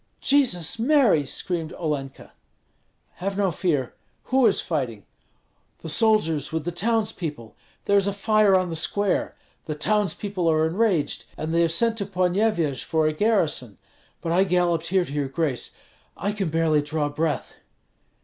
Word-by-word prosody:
"Jesus 225 - +2
Mary!" 230 - +3
screamed 170 +2 -3
Olenka. 145 -6 -5 0.9
"Have 195 +2 -3
no 195 -3 +1
fear! 150 -7 -1 0.3
Who 260 -2 +3
is 205 - +2
fighting?" 125 - -3 0.8
"The 160 - -6
soldiers 165 - +2
with 160 -1 -3
the 175 - -2
townspeople. 175 - -2 0.3
There 200 - +3
is 200 0 +2
a - - +1
fire 210 -1 +3
on 185 -2 +1
the - - -3
square! 200 +4 0 0.3
The 155 - -4
townspeople 200 0 0
are 155 0 +3
enraged, 180 -2 0
and 155 +1 -3
they 170 - +3
have 165 -1 +2
sent 225 +6 +1
to 200 - -3
Ponyevyej 180 - 0
for 160 -1 0
a 155 - +1
garrison. 155 - 0 0.4
But 165 - -3
I 180 +3 +4
galloped 175 -3 +1
here 185 0 +2
to 140 - -8
your 145 -2 -1
grace. 140 -2 -2 0.5
I 205 - -1
can 200 -4 -2
barely 160 -1 +2
draw 150 0 -2
breath." 150 +1 -2
170 Hz, 155 wpm, -24 LUFS, 155-200 Hz, 0.9 s, I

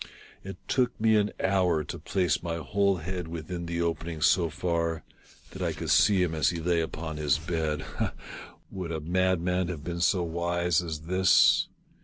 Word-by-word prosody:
It 95 0 -7
took 125 -2 0
me 110 0 +4
an 105 -1 +3
hour 90 -5 +2
to - - -7
place 90 -2 0
my 85 -1 -3
whole 100 +6 +1
head 90 +1 -5
within 85 +1 -5
the 85 0 -1
opening 85 -1 -3
so 85 +1 +3
far 85 -1 -2 0.5
that - - -9
I - - 0
could - - -3
see 95 -3 +5
him 85 -2 -1
as 80 -4 +2
he 85 - -3
lay 85 0 +1
upon 80 -1 -5
his 75 -1 +2
bed. 80 -1 -2
Ha! - - -3 0.3
— - - -23
would 90 -3 -5
a 80 - -2
madman 90 +2 0
have 85 -5 -5
been 85 +1 -4
so 90 0 +2
wise 85 0 0
as 80 -3 -5
this 95 +3 +4
85 Hz, 185 wpm, -28 LUFS, 80-90 Hz, 0.5 s, see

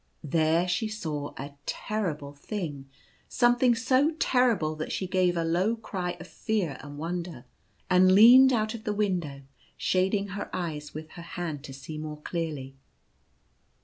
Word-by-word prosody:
There 160 +3 +2
she 180 +5 0
saw 155 -9 -4
a 140 +1 -7
terrible 160 -10 -3
thing 145 -4 -6 0.2
— - - -33
some 240 0 +4
thing 245 -1 +3
so 255 +7 +2
terrible 240 - +2
that 155 - -4
she 190 - -2
gave 185 -1 +1
a 165 - +1
low 180 +7 +1
cry 185 -6 -4
of 175 - -8
fear 185 -2 -2
and 145 0 -9
wonder, 170 -4 -5 0.4
and 185 0 +5
leaned 245 +6 +9
out 220 -2 0
of 225 -2 -8
the 210 - -1
window, 175 -9 -1 0.3
shading 195 +2 +1
her 200 +1 -5
eyes 155 -5 -4
with 155 0 -7
her 170 - -10 0.2
hand 160 -5 -4
to 135 - -9
see 150 +3 -8
more 155 -1 -6
clearly. 150 -5 -4
175 Hz, 160 wpm, -28 LUFS, 155-215 Hz, 0.4 s, leaned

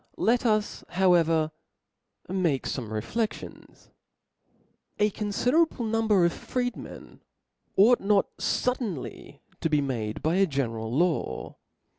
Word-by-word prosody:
Let 240 +2 +2
us 215 -1 0
however 165 -4 +3 0.8
make 175 -7 0
fome 125 -5 -3
rcflcftions. 120 - -5 1.1
A 210 0 +2
confiderable 245 - +1
number 215 -4 +3
of 170 - +1
freed 245 -1 -3
men - - -11 0.6
ought 230 +6 +6
notfud* 210 +5 +1
denly 190 - -6 0.2
to 165 - 0
be 150 -1 +3
made 115 -6 -3
by 160 +4 +2
a 195 0 +4
general 115 -6 -2
law. 155 - -1
185 Hz, 110 wpm, -27 LUFS, 145-220 Hz, 1.1 s, ought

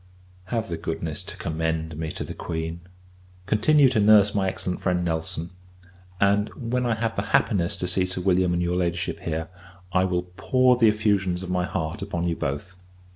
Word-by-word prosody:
Have 110 +3 -2
the 85 - -4
goodness 80 -1 -3
to - - -6
commend 80 0 -2
me 80 0 -4
to - - -4
the - - -6
Queen; 80 0 -4 0.7
continue 135 +9 +4
to 120 - +1
nurse 105 -1 +6
my 100 -2 +1
excellent 90 -1 -4
friend, 90 -2 0
Nelson; 80 0 -2 0.7
and, 100 +2 +3
when 125 0 -1
I 115 - +1
have 115 0 -2
the - - 0 0.2
happiness 90 -6 0
to - - -2
see 90 +1 +1
Sir 90 0 -2
William 90 -1 +2
and 85 0 0
your 90 +1 0
Ladyship 85 -1 -1
here, 80 0 -3 0.5
I 95 0 +3
will 90 -1 0
pour 130 -1 +4
the 120 -2 +4
effusions 100 -4 +1
of 90 - -5
my 90 -1 +1
heart 80 +4 -3
upon 90 -3 -2
you 85 - 0
both. 75 +7 -4
90 Hz, 185 wpm, -25 LUFS, 85-105 Hz, 0.7 s, nurse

